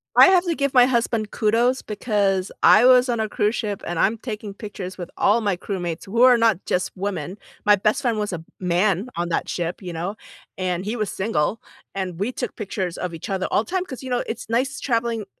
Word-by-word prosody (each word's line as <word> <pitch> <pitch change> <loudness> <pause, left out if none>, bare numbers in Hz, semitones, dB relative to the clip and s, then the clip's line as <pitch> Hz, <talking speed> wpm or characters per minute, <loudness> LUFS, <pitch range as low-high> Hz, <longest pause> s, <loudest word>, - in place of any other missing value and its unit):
I - - +9
have 370 -1 +4
to 345 - +1
give 280 -2 -1
my 245 -1 +8
husband 230 -4 0
kudos 235 +4 +2
because 200 -3 0
I 220 +4 +7
was 250 0 +6
on 235 - 0
a 220 - 0
cruise 210 +1 0
ship, 205 -2 -3
and 175 -1 -3
I'm 215 +6 +2
taking 215 -3 -6
pictures 195 -3 -7
with 175 -1 -7
all 220 +3 +3
my 200 -4 0
crewmates 175 -3 -4
who 230 +4 -1
are 250 -1 +7
not 225 -5 +2
just 180 - 0
women, 190 -1 -4 0.3
my 210 0 +7
best 215 +6 +1
friend 235 -4 +1
was 210 -1 -2
a 175 - -2
m 160 - -12
man 185 +3 +1
on 175 0 -2
that 165 - -1
ship, 175 +2 -3
you 180 -2 -6
know? 175 +5 -4 0.4
And 185 0 -2
he 220 - -2
was 215 -3 -2
single, 190 0 -1 0.4
and 185 -3 -4
we 205 +6 -1
took - - -5
pictures 190 -4 -4
of 180 -2 -4
each 160 - -8
other 190 -1 -1
all 220 - +1
time 370 - -2
‘cause, 260 -5 -8
you 260 - -6
know, 245 - +1
it's 225 - -5
nice 260 +4 0
traveling 230 -3 -1
210 Hz, 225 wpm, -23 LUFS, 185-235 Hz, 0.4 s, I